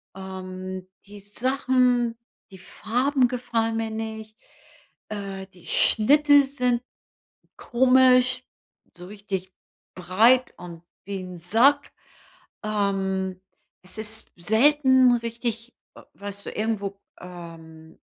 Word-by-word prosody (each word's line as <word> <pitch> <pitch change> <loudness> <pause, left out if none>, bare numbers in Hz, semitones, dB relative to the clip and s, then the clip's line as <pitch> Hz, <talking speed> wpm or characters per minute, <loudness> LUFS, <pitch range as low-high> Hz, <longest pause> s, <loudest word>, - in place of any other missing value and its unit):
Ähm, 185 -1 -7 0.2
die 205 +1 -12
Sachen, 250 +1 +1 0.3
die 190 - -12
Farben 250 +6 0
gefallen 230 -2 -2
mir 225 -1 -2
nicht 220 0 -6 0.7
äh, 195 -2 -6
die 180 -3 -19
Schnitte 285 +5 +5
sind 250 -3 -1 0.7
komisch, 255 0 +3 0.5
so 180 - -11
richtig 195 -2 -6 0.4
breit 220 +8 +3
und 170 -2 -11 0.2
wie 200 0 -5
‘n 180 -1 -8
Sack, 235 - +3 0.7
ähm, 190 -3 -1 0.4
es 185 - -11
ist 220 0 -3
selten 260 +6 +4
richtig 230 0 -5 0.2
äh, - - -14
weißt 200 0 -8
du, - - -5
irgendwo 205 -2 -3 0.2
ähm, 165 -2 -12
215 Hz, 100 wpm, -24 LUFS, 190-250 Hz, 0.7 s, Schnitte